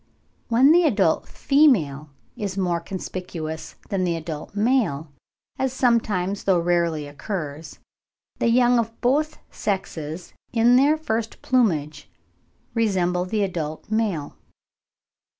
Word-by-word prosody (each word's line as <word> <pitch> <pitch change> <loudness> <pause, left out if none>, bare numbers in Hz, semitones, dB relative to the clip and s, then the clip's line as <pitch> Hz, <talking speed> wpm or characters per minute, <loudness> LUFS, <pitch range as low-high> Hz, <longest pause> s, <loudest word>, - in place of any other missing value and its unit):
When 255 +5 +5
the 345 +2 +6
adult 205 - +2
female 185 - +2 0.3
is 200 -2 -4
more 175 -3 0
conspicuous 170 -3 -6
than 195 -3 0
the 175 -2 0
adult 160 +2 -6
male, 205 - +1 0.5
as 265 -1 0
sometimes 210 -7 +1
though 190 -2 +4
rarely 170 -3 +1
occurs, 150 0 -6 0.6
the - - +2
young 245 +1 +4
of 225 0 -3
both 300 +5 +1
sexes 170 -4 -4 0.2
in 235 +1 +4
their 285 +4 +4
first 225 -8 -3
plumage 170 - 0 0.6
resemble 180 -6 +1
the 210 +2 0
adult 165 -1 -4
male. 205 -10 -1
195 Hz, 115 wpm, -23 LUFS, 165-235 Hz, 0.6 s, the